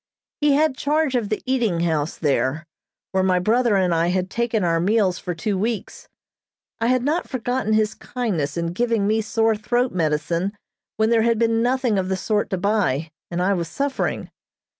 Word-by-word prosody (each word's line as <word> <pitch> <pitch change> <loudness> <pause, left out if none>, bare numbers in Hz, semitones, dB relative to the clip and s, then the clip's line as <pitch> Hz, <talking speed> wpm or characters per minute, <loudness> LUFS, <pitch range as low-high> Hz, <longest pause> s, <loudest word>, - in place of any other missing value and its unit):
He 295 -1 +3
had 300 -1 +2
charge 295 0 0
of 235 -5 0
the 215 - -2
eating 235 -10 +1
house 160 -2 -1
there, 150 +1 0 0.5
where 190 - +1
my 185 -1 +2
brother 225 +4 +2
and 180 -2 +2
I 165 +1 +2
had 185 +1 -1
taken 235 -3 0
our 165 -1 +2
meals 190 0 +2
for 180 -2 -4
two 195 +3 -2
weeks. 220 +1 -3 0.7
I 230 - +1
had 255 0 +2
not 310 +6 -1
forgotten 245 -3 -1
his 215 0 +2
kindness 175 - -3
in 170 0 -2
giving 230 0 +1
me 220 +2 +2
sore 225 +1 +1
throat 240 +4 0
medicine 170 +3 -1 0.4
when 220 +1 +2
there 230 -1 +4
had 230 0 +2
been 225 0 +2
nothing 245 -3 +1
of 185 0 -2
the 190 - 0
sort 210 +2 -1
to 190 - -1
buy, 175 -7 0 0.2
and 175 +1 -1
I 200 +2 +2
was 170 -3 -2
suffering. 275 - -2
210 Hz, 185 wpm, -22 LUFS, 175-235 Hz, 0.7 s, there